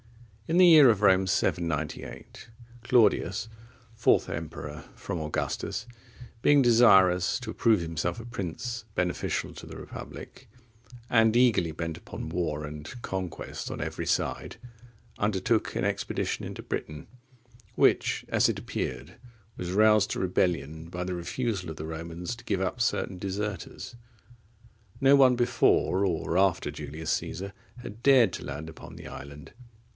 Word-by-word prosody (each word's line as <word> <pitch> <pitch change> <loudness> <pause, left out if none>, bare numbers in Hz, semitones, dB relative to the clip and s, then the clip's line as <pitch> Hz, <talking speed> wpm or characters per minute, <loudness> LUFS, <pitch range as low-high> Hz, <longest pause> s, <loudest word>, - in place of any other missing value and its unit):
In 165 - +1
the 185 - +8
year 155 -6 +9
of 110 -3 +2
Rome 95 -2 +4
798,(38) 80 +1 -2 0.4
Claudius, 110 -6 +2 0.5
fourth 110 - +3
emperor 75 -1 -6
from 80 - -5
Augustus, 75 +7 -3 0.6
being 145 +2 +5
desirous 95 -8 +5
to 120 -3 -6
approve 110 -3 +3
himself 85 +4 -3
a 115 - -8
prince 115 +2 -5
beneficial 90 -1 -1
to - - -10
the - - -9
republic, - - -10 0.6
and 115 -1 +4
eagerly 115 -10 +3
bent 85 +1 -4
upon - - -7
war 80 -3 -2
and 75 +11 -8
conquest 95 -4 -5
on - - -5
every - - -4
side, - - -1 0.6
undertook 105 +2 0
an - - 0
expedition - - -2
into - - -7
Britain, 75 -1 -5 0.7
which - - +2
as - - +3
it - - -1
appeared, 65 +7 -5 0.4
was 90 0 -5
roused 105 +1 +4
to - - -2
rebellion 80 -4 -1
by 90 0 -4
the 90 0 -3
refusal 95 +1 -3
of 80 - -7
the 80 - -5
Romans 85 +6 -5
to 120 - -15
give 95 - -1
up 95 +6 -2
certain 100 -4 0
deserters. 100 +2 -5 1.0
No 135 0 +6
one 130 -2 +6
before 100 -5 +2
or 85 -1 -1
after 95 -2 +2
Julius 80 +2 -5
Caesar 100 +1 -3 0.2
had 115 -2 -10
dared 130 -8 +5
to - - -6
land 75 +3 -6
upon 80 - -11
the - - -9
island. 70 +1 -10
95 Hz, 140 wpm, -28 LUFS, 80-115 Hz, 1.0 s, year